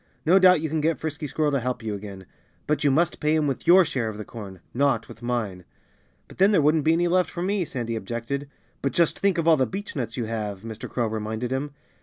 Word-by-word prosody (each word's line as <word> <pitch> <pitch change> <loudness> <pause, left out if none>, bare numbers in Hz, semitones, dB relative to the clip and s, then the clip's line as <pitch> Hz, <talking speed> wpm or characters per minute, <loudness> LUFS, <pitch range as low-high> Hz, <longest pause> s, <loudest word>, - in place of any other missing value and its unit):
No 180 +4 +6
doubt 185 -3 +6
you 160 - -1
can 155 0 -1
get 160 +2 +1
Frisky 150 -1 -4
Squirrel 150 +2 0
to 140 - +1
help 125 -1 -3
you 110 -1 -3
again. 100 -2 -8 0.4
But 150 +1 0
you 145 - +4
must 165 +5 +1
pay 150 +1 +2
him 155 -1 +2
with 140 +2 -3
your 180 +1 +7
share 125 -7 -2
of 105 - -7
the 105 - -6
corn 100 -5 -9
not 125 -3 +1
with 115 - -13
mine." 115 -7 -2 0.6
"But - - -16
then 195 +2 +6
there 200 - +4
wouldn't 150 0 +3
be 160 - +5
any 175 +1 +2
left 180 -1 +2
for 175 - -4
me," 195 -1 0
Sandy 120 -5 -4
objected. 120 +6 -4 0.3
"But 140 - -1
just 170 -2 +2
think 195 -2 +2
of 165 -1 0
all 160 -2 +6
the 130 - +2
beechnuts 140 - -5
you 120 - -1
have," 105 -3 -4
Mr. 110 0 -7
Crow 120 - -1
reminded 110 +2 -3
him. 140 +2 -3
140 Hz, 245 wpm, -25 LUFS, 115-160 Hz, 0.6 s, your